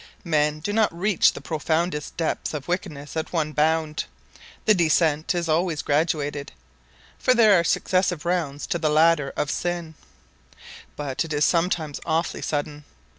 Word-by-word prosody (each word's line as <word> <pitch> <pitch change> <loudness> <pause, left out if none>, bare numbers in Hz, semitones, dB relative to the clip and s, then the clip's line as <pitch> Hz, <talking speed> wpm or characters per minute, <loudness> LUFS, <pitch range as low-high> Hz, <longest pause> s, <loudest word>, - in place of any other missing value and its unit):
Men 150 -2 +1
do 205 +6 -3
not 220 -1 +3
reach 185 +3 +3
the - - -8
profoundest 160 0 -2
depths 160 -1 -2
of 145 -2 -6
wickedness 155 -5 -4
at 160 - -3
one 155 -3 -1
bound. 155 0 0 0.6
The 215 - +6
descent 160 -2 +2
is 170 -1 -1
always 160 -1 0
graduated 145 -1 -1 0.7
for 255 - +3
there 220 -3 +6
are - - +1
successive 180 -1 0
rounds 165 -5 -1
to 170 - -2
the 155 -2 +1
ladder 155 -2 +3
of 145 - -1
sin 175 -2 -3 1.0
but 140 -1 -2
it 160 -1 -5
is 145 0 +2
sometimes 165 -4 0
awfully 165 0 -1
sudden. 145 0 -3
160 Hz, 150 wpm, -24 LUFS, 150-175 Hz, 1.0 s, The